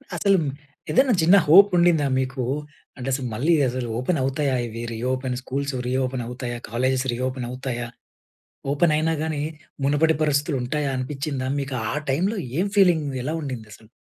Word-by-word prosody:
అసలుమ్ 195 Hz, -6 st, +2 dB, 0.4 s
ఏదన్నా 265 Hz, -1 st, +4 dB
చిన్న 175 Hz, +5 st, +6 dB
హోపుండిందా 175 Hz, -3 st, +6 dB
మీకు? 130 Hz, -1 st, -2 dB, 0.5 s
అంటెసు 135 Hz, +1 st, -2 dB
మళ్ళీ 140 Hz, +10 st, +2 dB, 0.2 s
అసలు 125 Hz, -1 st, -3 dB
ఓపెనవుతాయా 135 Hz, 0 st, 0 dB
ఇవి? 115 Hz, +1 st, -6 dB
Reopen 130 Hz, +2 st, -2 dB
schools 140 Hz, +2 st, -3 dB
రీఓపెనవుతాయా? 125 Hz, -1 st, -2 dB
కాలేజేస్ 130 Hz, +3 st, 0 dB
రీఓపెనవుతాయా? 125 Hz, -1 st, -3 dB, 0.8 s
ఓపెనయినా 155 Hz, +1 st, +2 dB
గానీ, 155 Hz, -2 st, -2 dB, 0.4 s
మునుపటి 155 Hz, +3 st, +3 dB
పరిస్థితులుంటాయా 145 Hz, -1 st, 0 dB
అనిపిచ్చిందా? 135 Hz, 0 st, -3 dB
మీకు 140 Hz, -1 st, -4 dB, 0.2 s
ఆ -, -, -2 dB, 0.2 s
టైమ్‌లో 190 Hz, +10 st, 0 dB, 0.2 s
ఏం 195 Hz, -, +2 dB
ఫీలింగ్, 175 Hz, -6 st, +4 dB, 0.2 s
ఎలా 150 Hz, -, -2 dB
ఉండిందసలు? 110 Hz, -6 st, -8 dB
135 Hz, 115 wpm, -23 LUFS, 125-155 Hz, 0.8 s, చిన్న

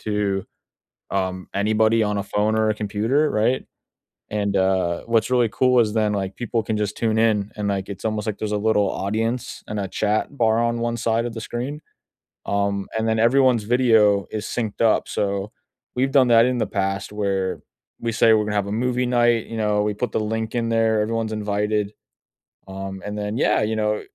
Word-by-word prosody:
to, 105 Hz, -2 st, -1 dB, 0.7 s
um, 95 Hz, -1 st, -2 dB
anybody 110 Hz, +2 st, +2 dB
on 105 Hz, -1 st, 0 dB
a -, -, -1 dB
phone 105 Hz, +2 st, 0 dB
or 110 Hz, 0 st, +2 dB
a -, -, 0 dB
computer, 110 Hz, +9 st, 0 dB
right? 115 Hz, +5 st, +1 dB, 0.7 s
And, 100 Hz, -1 st, -1 dB
uh, 95 Hz, -2 st, +1 dB
what's 115 Hz, +1 st, +1 dB
really 120 Hz, -3 st, +3 dB
cool 125 Hz, +1 st, +3 dB
is 110 Hz, -2 st, +1 dB
then, 105 Hz, -2 st, +1 dB
like, 95 Hz, -1 st, -3 dB
people 120 Hz, -1 st, -1 dB
can 110 Hz, 0 st, -2 dB
just 105 Hz, -1 st, -2 dB
tune 110 Hz, -1 st, 0 dB
in 110 Hz, -2 st, +2 dB
and 105 Hz, -1 st, -2 dB
like, 100 Hz, 0 st, -2 dB
it's 100 Hz, -, -5 dB
almost 110 Hz, -1 st, -2 dB
like 105 Hz, -2 st, -3 dB
there's 105 Hz, -1 st, -3 dB
a -, -, +1 dB
little 105 Hz, -2 st, +2 dB
audience 115 Hz, +5 st, -2 dB
and 105 Hz, -, -3 dB
a 95 Hz, -, -3 dB
chat 105 Hz, +7 st, -1 dB
bar 110 Hz, -1 st, +3 dB
on 120 Hz, 0 st, -1 dB
1 120 Hz, 0 st, -1 dB
side 115 Hz, 0 st, 0 dB
of 120 Hz, -, -4 dB
the 115 Hz, -, -5 dB
screen, 130 Hz, +7 st, -4 dB, 0.7 s
um, 100 Hz, -1 st, -1 dB
and 110 Hz, -, -1 dB
then 110 Hz, 0 st, +1 dB
everyone's 120 Hz, -1 st, +4 dB
video 110 Hz, -4 st, +3 dB
is 105 Hz, -1 st, -4 dB
synced 110 Hz, -4 st, -4 dB
up. 115 Hz, -1 st, +3 dB
So, 100 Hz, +1 st, -2 dB, 0.4 s
we've 135 Hz, +2 st, +1 dB
done 130 Hz, -3 st, +5 dB
that 115 Hz, 0 st, +6 dB
in 125 Hz, 0 st, 0 dB
the -, -, 0 dB
past 100 Hz, 0 st, -2 dB
where 95 Hz, -2 st, -1 dB, 0.4 s
we 115 Hz, -, -2 dB
say 115 Hz, 0 st, +4 dB
we're 110 Hz, -1 st, +3 dB
gonna 105 Hz, 0 st, -3 dB
have 100 Hz, -1 st, 0 dB
a -, -, -3 dB
movie 125 Hz, +2 st, 0 dB
night. 120 Hz, -2 st, +2 dB
You 115 Hz, -, -7 dB
know, 105 Hz, -1 st, +1 dB
we 105 Hz, 0 st, 0 dB
put 120 Hz, +1 st, -3 dB
the -, -, 0 dB
link 110 Hz, +1 st, -3 dB
in 115 Hz, -1 st, 0 dB
there, 115 Hz, -1 st, +2 dB
everyone's 115 Hz, 0 st, -2 dB
invited. 105 Hz, 0 st, -1 dB, 0.8 s
Um, 95 Hz, 0 st, -6 dB
and 105 Hz, 0 st, -5 dB
then 105 Hz, +1 st, -3 dB
yeah, -, -, +2 dB
you 110 Hz, +1 st, 0 dB
know, 105 Hz, 0 st, 0 dB
110 Hz, 205 wpm, -22 LUFS, 100-115 Hz, 0.8 s, that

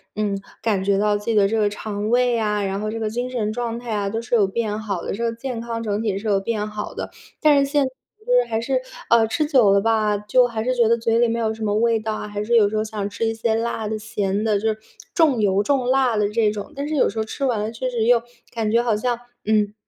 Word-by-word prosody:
嗯， 210 Hz, -1 st, -1 dB, 0.3 s
感 205 Hz, -4 st, +1 dB
觉 195 Hz, 0 st, +2 dB
到 210 Hz, 0 st, +2 dB
自 205 Hz, -, -5 dB
己 230 Hz, -, 0 dB
的 200 Hz, -2 st, +5 dB
这 225 Hz, +2 st, 0 dB
个 210 Hz, -1 st, +3 dB
肠 210 Hz, 0 st, -4 dB
胃 245 Hz, 0 st, +3 dB
啊， 210 Hz, -2 st, 0 dB
然 195 Hz, +1 st, -2 dB
后 215 Hz, -, -2 dB
这 225 Hz, +1 st, -4 dB
个 220 Hz, -, -1 dB
精 245 Hz, +2 st, -2 dB
神 215 Hz, -4 st, -2 dB
状 235 Hz, 0 st, -3 dB
态 240 Hz, -2 st, -5 dB
啊， 200 Hz, -1 st, -1 dB
都 225 Hz, +3 st, -2 dB
是 230 Hz, -, -8 dB
有 210 Hz, -5 st, +5 dB
变 215 Hz, +1 st, -2 dB
好 200 Hz, -5 st, -4 dB
的， -, -, -3 dB
这 230 Hz, -, -4 dB
个 230 Hz, -, +1 dB
健 230 Hz, 0 st, -5 dB
康 230 Hz, -1 st, -4 dB
整 210 Hz, -1 st, -1 dB
体 210 Hz, -4 st, -1 dB
是 215 Hz, +2 st, -5 dB
有 200 Hz, -2 st, +3 dB
变 210 Hz, +1 st, -2 dB
好 210 Hz, 0 st, -6 dB
的。 -, -, -5 dB, 0.3 s
但 300 Hz, -2 st, +5 dB
是 275 Hz, 0 st, 0 dB
现 290 Hz, -2 st, +3 dB
在 260 Hz, -, -4 dB, 0.3 s
就 -, -, +1 dB
是 -, -, +3 dB
还 225 Hz, 0 st, -1 dB
是 -, -, 0 dB, 0.3 s
呃， 230 Hz, -1 st, +5 dB
吃 305 Hz, +7 st, 0 dB
久 255 Hz, -9 st, +4 dB
了 200 Hz, 0 st, +4 dB
吧， 215 Hz, -1 st, +2 dB
就 210 Hz, +5 st, +3 dB
还 225 Hz, -2 st, -3 dB
是 255 Hz, +2 st, 0 dB
觉 235 Hz, -2 st, +4 dB
得 230 Hz, -, +4 dB
嘴 230 Hz, 0 st, +1 dB
里 240 Hz, -, +4 dB
没 230 Hz, -, -1 dB
有 220 Hz, -1 st, 0 dB
什 220 Hz, 0 st, -7 dB
么 205 Hz, -1 st, 0 dB
味 230 Hz, +1 st, +2 dB
道 220 Hz, 0 st, -3 dB
啊， 210 Hz, -, -5 dB
还 205 Hz, 0 st, -4 dB
是 235 Hz, +3 st, +1 dB
有 210 Hz, -3 st, +5 dB
时 215 Hz, -, -4 dB
候 215 Hz, -, +1 dB
想 215 Hz, -2 st, -4 dB
吃 225 Hz, +2 st, -2 dB
一 225 Hz, -, 0 dB
些 225 Hz, 0 st, 0 dB
辣 225 Hz, -1 st, -2 dB
的、 215 Hz, +1 st, -2 dB
咸 210 Hz, -1 st, -2 dB
的， 215 Hz, -2 st, +2 dB
就 220 Hz, -, -1 dB
是， 215 Hz, -, -2 dB, 0.4 s
重 295 Hz, -9 st, +3 dB
油 200 Hz, -1 st, +2 dB
重 260 Hz, +1 st, +1 dB
辣 260 Hz, -3 st, +3 dB
的 210 Hz, -1 st, +1 dB
这 215 Hz, 0 st, +2 dB
种。 210 Hz, +6 st, -6 dB
但 280 Hz, +1 st, -3 dB
是 310 Hz, -, -2 dB
有 -, -, +3 dB
时 225 Hz, -, -9 dB
候 220 Hz, -, 0 dB
吃 275 Hz, -, -6 dB
完 235 Hz, -5 st, +1 dB
了 215 Hz, +1 st, -2 dB
确 255 Hz, +3 st, -3 dB
实 230 Hz, -3 st, -1 dB
又 240 Hz, -1 st, +4 dB, 0.3 s
感 225 Hz, -2 st, -1 dB
觉 235 Hz, +1 st, +4 dB
好 230 Hz, -3 st, +1 dB
像， 240 Hz, +2 st, -1 dB, 0.3 s
嗯， 210 Hz, -1 st, +2 dB
220 Hz, 310 characters per minute, -22 LUFS, 210-235 Hz, 0.4 s, 的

